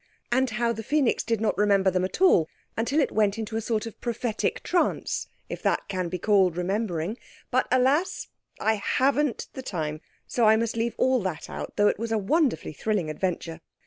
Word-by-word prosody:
And 260 +1 +2
how 235 +1 0
the 225 - -5
Phœnix 275 +2 +1
did 230 -2 0
not 220 - +1
remember 200 -2 +4
them 185 0 0
at 190 - -4
all 175 - +5 0.3
until 235 +7 +1
it 290 - +2
went 210 -1 +2
into 220 0 -4
a 225 - 0
sort 220 0 -1
of 225 - -9
prophetic 235 -1 -2
trance—if 355 - -2
that - - 0
can 185 -3 -2
be 180 - -3
called 190 -3 +3
remembering. 190 +1 -2 0.3
But, 255 +1 +2
alas! 275 +9 +2 0.3
I 220 -2 +1
haven't 280 0 +1
time, 155 -7 -3 0.2
so 235 - +1
I 215 0 +7
must 230 0 -1
leave 230 +1 -1
all 260 0 +3
that 185 -6 -4
out - - -6
though 205 0 +4
it - - +1
was 230 0 -3
a 225 - +2
wonderfully 235 - +1
thrilling 185 -1 -1
adventure. 165 0 -3
220 Hz, 185 wpm, -26 LUFS, 190-240 Hz, 0.3 s, I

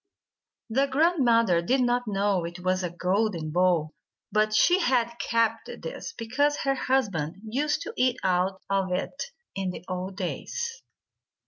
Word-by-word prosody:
The 265 +4 +2
grandmother 255 - +3
did 255 +10 +2
not 245 -1 +1
know 200 -3 +1
it 170 +1 -6
was 185 +1 +1
a 180 - -2
golden 180 -2 -1
bowl, 175 -3 +2 0.4
but 215 +1 +2
she 350 - +4
had 245 -7 +2
kept 230 -1 +1
this - - -6
because 285 +6 +1
her 275 - +2
husband 200 - 0
used 275 +7 -1
to - - -6
eat 255 0 +2
out 185 +1 +1
of 195 -1 0
it 230 - -2 0.3
in 195 -1 -2
the 180 -1 -7
old 185 +1 -4
days. 465 - -4
215 Hz, 145 wpm, -27 LUFS, 185-260 Hz, 0.4 s, she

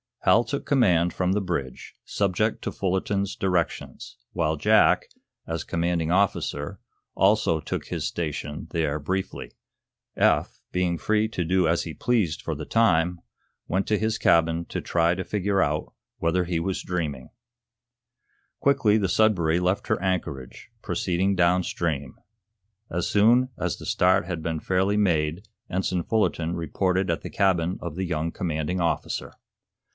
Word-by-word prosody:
Hal 115 - +5
took 140 +3 -4
command 90 - +3
from 90 0 0
the 105 - +1
bridge, 85 -9 -4
subject 100 +2 0
to - - -2
Fullerton's 100 +1 -1
directions, 90 -3 -2 0.2
while 80 -3 0
Jack, 75 - +4 0.4
as 80 -1 -3
commanding 85 -1 -1
officer, 90 -6 0 0.4
also 95 -5 +3
took - - -4
his - - -3
station 75 -2 -4
there 75 -3 0
briefly. 95 +6 -3 0.6
Eph, - - +2
being 90 -1 0
free 110 +4 +1
to 90 -5 -2
do 90 +1 +2
as 85 +1 +1
he 80 - -6
pleased 105 -9 0
for 80 - -3
the 75 +1 -6
time, 90 -6 +2 0.5
went 95 +3 0
to 105 - +2
his 110 +1 0
cabin 85 0 +3
to - - -4
try 85 0 +2
to 95 - -3
figure 100 -1 0
out 75 +1 -1 0.2
whether 90 +2 +1
he 85 -1 -1
were 95 +3 -1
dreaming. 75 -8 -3 1.3
Quickly 135 -7 +3
the 100 -4 0
"Sudbury" 90 -7 +3
left 90 +2 0
her - - 0
anchorage, 80 -9 -3
proceeding 95 +2 0
downstream. 85 -5 0 0.8
As 85 +1 -1
soon 120 +5 +4
as - - -2
the - - -10
start 90 -1 +3
had 85 -2 -4
been 80 -1 -2
fairly 95 +4 +1
made 85 -1 +1 0.2
Ensign 90 -1 -1
Fullerton 85 -6 0
reported 90 +3 0
at 85 - -2
the - - -6
cabin 90 -3 +1
of 85 -3 -5
the 95 +1 -2
young 85 -1 -2
commanding 80 +1 -2
officer. 85 - -2
90 Hz, 145 wpm, -25 LUFS, 80-95 Hz, 1.3 s, Hal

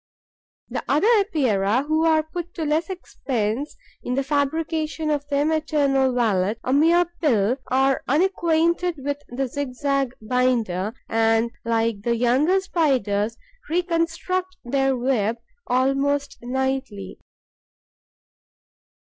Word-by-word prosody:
The - - -4
other 295 +7 +2
Epeirae, 255 - +1
who 315 +2 +1
are 315 -1 +3
put 345 +2 -7
to 320 - -3
less 315 +3 0
expense 265 - -3 0.2
in 250 - -3
the 275 - 0
fabrication 305 +2 -1
of 290 -1 -2
their 285 0 +1
maternal 290 -4 +1
wallet 215 -3 +1
a 255 - 0
mere 335 +5 +4 0.2
pill 240 - +2
are 265 +1 +2
unacquainted 340 +2 +1
with 285 +1 -4
the 265 +2 -3
zigzag 275 0 -2
binder 225 -4 0
and, 225 +1 +2
like 230 -2 0
the 235 +2 0
younger 260 +11 +3
Spiders, 240 - 0 0.3
reconstruct 355 +2 -1
their 270 +1 +1
web 235 -3 0 0.3
almost 275 +2 0
nightly. 265 -4 -3
275 Hz, 110 wpm, -23 LUFS, 240-315 Hz, 0.3 s, mere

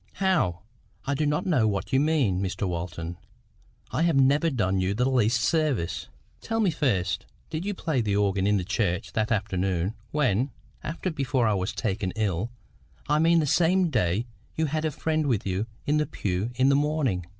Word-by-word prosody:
"How? 165 - +1 0.4
I 140 - 0
do 150 +2 0
not 150 +1 0
know 150 - +3
what 100 +3 -2
you 130 - +5
mean, 140 - +2
Mr 95 +1 -2
Walton. 85 -1 -4 0.7
I - - 0
have 170 -2 +3
never 140 +4 +4
done 95 -9 0
you 95 +2 0
the 125 +3 +2
least 120 -3 +2
service." 135 - 0 0.3
"Tell 225 0 -2
me 205 -5 +3
first, 125 - 0 0.2
did 160 +3 -3
you 205 -1 -2
play 155 -8 0
the 105 -3 0
organ 100 -1 +1
in 105 0 +3
church 100 -2 -1
that 110 0 0
afternoon 95 -2 0 0.2
when—after—before 140 - -1
I 110 - +3
was 95 -1 -1
taken 95 -4 -2
ill—I 110 - -3
mean 165 +1 +4
the - - 0
same 175 +4 +3
day 105 - +1 0.3
you 160 - +1
had—a 155 +1 -1
friend 155 +1 -1
with 120 -7 0
you 95 +3 -1 0.2
in 150 +1 +2
the 150 - +1
pew 95 +3 -2
in 130 +2 +3
the 140 - +4
morning 140 - 0
120 Hz, 175 wpm, -26 LUFS, 95-150 Hz, 0.7 s, you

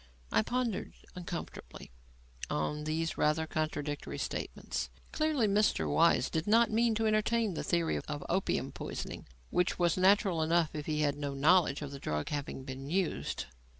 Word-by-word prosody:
I 110 - +4
pondered 245 - -2 0.2
uncomfortably 170 - -7 0.6
on 150 - -2
these 160 +1 -1
rather 155 +1 +2
contradictory 150 -2 -3
statements. - - -3 0.2
Clearly 310 -6 +1
Mr. 210 +1 +2
Weiss 160 -6 +3
did 160 +3 -1
not 230 +1 +5
mean 230 0 +3
to 225 +1 0
entertain 215 0 +2
the - - -3
theory 170 -2 +1
of 145 -1 -4
opium 190 +2 0
poisoning; - - -6 0.2
which 180 0 +1
was 175 -1 +2
natural 190 -2 +4
enough 165 0 +2
if 150 -2 -5
he 150 -1 0
had 145 -1 +1
no 145 -1 -3
knowledge 155 0 +4
of 140 - -6
the 140 - -7
drug 75 - -2
having 145 -2 -4
been 135 +1 -7
used. 185 0 -1
165 Hz, 155 wpm, -32 LUFS, 145-200 Hz, 0.6 s, not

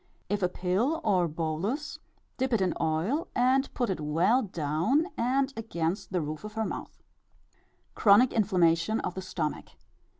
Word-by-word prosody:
If 205 -1 -1
a 180 - +2
pill 195 - 0
or 185 -7 +2
bolus, 165 - -3 0.4
dip 260 -1 -1
it 225 - +3
in 185 -2 +1
oil, 170 - 0
and 260 +2 +2
put 245 -5 0
it 185 - -3
well 170 - +2
down 175 - 0
and 265 +3 +1
against 190 -4 -3
the 180 -2 0
roof 155 +2 -5
of 210 0 -7
her 220 0 -1
mouth. - - -7 0.9
_Chronic 215 +4 +5
inflammation 185 -1 +2
of - - -3
the 190 - -5
stomach. 165 -5 -4
195 Hz, 155 wpm, -28 LUFS, 165-245 Hz, 0.9 s, Chronic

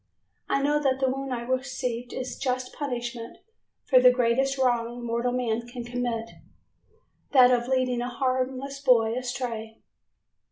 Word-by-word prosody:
I 275 - +1
know 295 +1 +2
that 265 -2 +1
the 265 -1 +2
wound 270 0 -4
I 240 -2 -2
received 250 -1 -3
is 255 -1 -4
the - - -17
just 255 -1 -2
punishment 240 -4 -5 0.5
for 255 -2 +6
the 250 - +8
greatest 250 +2 +1
wrong 240 -2 0
mortal 235 +1 0
man 235 -2 -1
can 240 0 -7
commit, 240 -1 -3 1.1
that 255 -2 +7
of 240 -1 +1
leading 255 -2 +1
a 245 - -2
harmless 260 +2 -2
boy 230 -5 +4
astray." 240 -3 -4
250 Hz, 150 wpm, -26 LUFS, 240-260 Hz, 1.1 s, the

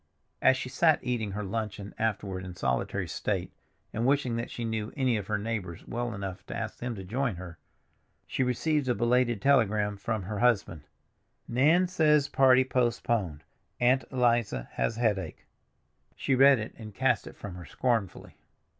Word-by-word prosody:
As 130 - +5
she 130 - -4
sat 155 +4 +3
eating 115 -5 -2
her 105 +1 -3
luncheon 105 -1 -4
afterward 100 -4 -2
in 90 -1 -8
solitary - - -1
state, - - -2 0.4
and 110 - -1
wishing 130 -2 +2
that 115 - -3
she 120 - -5
knew 110 -1 -3
any 130 -3 +2
of 105 -3 -3
her 105 - 0
neighbors 105 -6 -5
well 120 -1 -3
enough 95 -2 -6
to - - -5
ask - - -5
them 120 -1 -3
to 95 - -7
join 120 +3 -1
her, 85 -1 -9 0.7
she - - -3
received 130 +3 +1
a 120 - +2
belated 120 -2 +1
telegram 105 -7 +3
from 110 0 -3
her 105 +2 -4
husband: 100 -10 +1 0.6
"Nan 155 +10 +4
says 150 -5 +3
party 130 -1 +5
postponed; 115 - 0 0.4
Aunt 125 +2 +3
Eliza 120 - +1
has 60 - -1
headache." 110 -5 -1 0.7
She 135 - 0
read 135 +1 +7
it, 110 -1 -5
and 110 -3 -9
cast 130 -2 +1
it - - -10
from 100 - -7
her 90 -1 -9
scornfully. 115 -8 -2
115 Hz, 165 wpm, -29 LUFS, 100-130 Hz, 0.7 s, read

